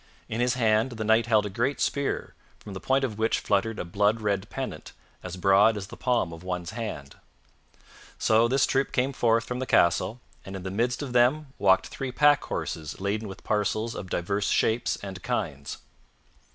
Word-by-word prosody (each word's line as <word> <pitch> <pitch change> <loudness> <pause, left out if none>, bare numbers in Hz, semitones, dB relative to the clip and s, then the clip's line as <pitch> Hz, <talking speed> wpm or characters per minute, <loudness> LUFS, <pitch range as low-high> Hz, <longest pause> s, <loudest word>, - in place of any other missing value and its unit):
In 115 +2 -2
his 125 0 +2
hand 115 0 +2
the 110 -1 -4
Knight 110 +2 +3
held 110 -2 +3
a - - -3
great 130 +8 -1
spear, 140 -1 -1 0.2
from 105 - -10
the 95 - -6
point 135 +5 +1
of 110 -5 -3
which 110 +1 +2
fluttered 105 +2 0
a - - -4
blood 105 +5 +1
red 100 -1 -1
pennant 130 - -6 0.3
as 90 0 -7
broad 100 +4 +4
as 100 - -5
the - - -11
palm 120 -9 0
of 80 - -10
one's 90 -1 -4
hand. 105 - -6 1.0
So 110 +1 +3
this 130 +2 +3
troop 135 +1 0
came 130 +2 +1
forth 115 -2 +2
from 125 0 -4
the 130 - -3
castle, 95 +6 +2 0.2
and 95 - -8
in 95 - -6
the 95 - -4
midst 120 +7 -1
of 130 -3 -6
them 135 +4 +2
walked 95 -1 +4
three 135 -1 -5
pack 145 +2 +4
horses 80 -2 -4
laden 105 +3 -2
with 95 - -10
parcels 110 +2 0
of 95 - -7
divers 100 +4 -1
shapes 115 +2 +1
and 95 -2 -7
kinds. 80 - -3
110 Hz, 190 wpm, -27 LUFS, 95-125 Hz, 1.0 s, broad